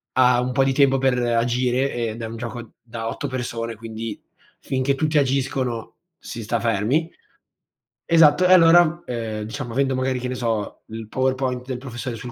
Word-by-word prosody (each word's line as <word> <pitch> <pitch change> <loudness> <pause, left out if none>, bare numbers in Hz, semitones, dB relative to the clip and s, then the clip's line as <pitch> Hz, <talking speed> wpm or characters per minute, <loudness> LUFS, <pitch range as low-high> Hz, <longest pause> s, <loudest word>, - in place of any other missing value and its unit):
ha 125 -1 +5
un 125 +1 -1
po' 135 - +3
di 135 - +2
tempo 135 -1 +4
per 130 -1 +2
agire. 120 +2 +1
Ed 115 -1 -3
è - - -3
un 115 +1 -7
gioco 120 0 -7
da 115 -1 -5
8 145 - -4
persone, 120 -3 -4
quindi, 110 -1 -6 0.4
finché 135 +1 -1
tutti 155 +2 0
agiscono, 130 -4 0 0.3
si 115 - -7
sta 115 +2 -1
fermi. 120 +9 0 0.9
Esatto. 165 +1 +5
E, 180 - +4
allora, 170 -1 +6
ehm, 115 -3 -4
diciamo, 120 +3 -6
avendo, 135 +1 +1
magari, 130 0 -1
che 125 - -4
ne 125 - -3
so, 115 -4 -3
il 110 0 -8
PowerPoint 130 0 -1
del 130 -1 -4
professore 125 -1 -6
sul 120 +3 -8
125 Hz, 175 wpm, -22 LUFS, 115-135 Hz, 0.9 s, allora